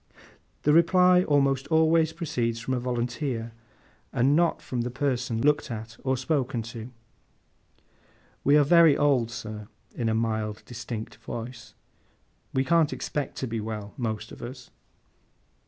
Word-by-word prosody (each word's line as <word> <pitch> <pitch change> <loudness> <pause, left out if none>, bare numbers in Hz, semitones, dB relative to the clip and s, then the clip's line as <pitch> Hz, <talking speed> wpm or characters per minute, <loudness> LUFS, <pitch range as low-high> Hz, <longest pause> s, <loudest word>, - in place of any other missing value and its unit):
The 150 - +4
reply 180 +2 +5
almost 140 -3 +2
always 160 +1 +3
proceeds 125 -9 -2
from 125 +3 -3
a 125 - 0
volunteer, 120 0 -2 0.6
and 135 +4 +3
not 170 0 +2
from 125 -2 -3
the 120 - -2
person 125 -3 -1
looked 145 +1 +2
at 110 -1 -6
or 130 0 +1
spoken 130 -3 -1
to. 115 0 -7 1.5
'We 145 +2 +5
are 150 - +6
very 165 0 +6
old, 135 -6 +2
sir,' 110 -3 -7 0.3
in 115 -2 -1
a 110 - +1
mild, 110 -2 -2
distinct 115 -2 -6
voice. 115 0 -8 0.8
'We 130 - +1
can't 165 +1 +3
expect 145 -3 -4
to 130 - -3
be 115 -1 -3
well, 105 -2 -6
most 110 -3 -4
of - - -11
us. 125 +1 -9
125 Hz, 140 wpm, -27 LUFS, 115-145 Hz, 1.5 s, are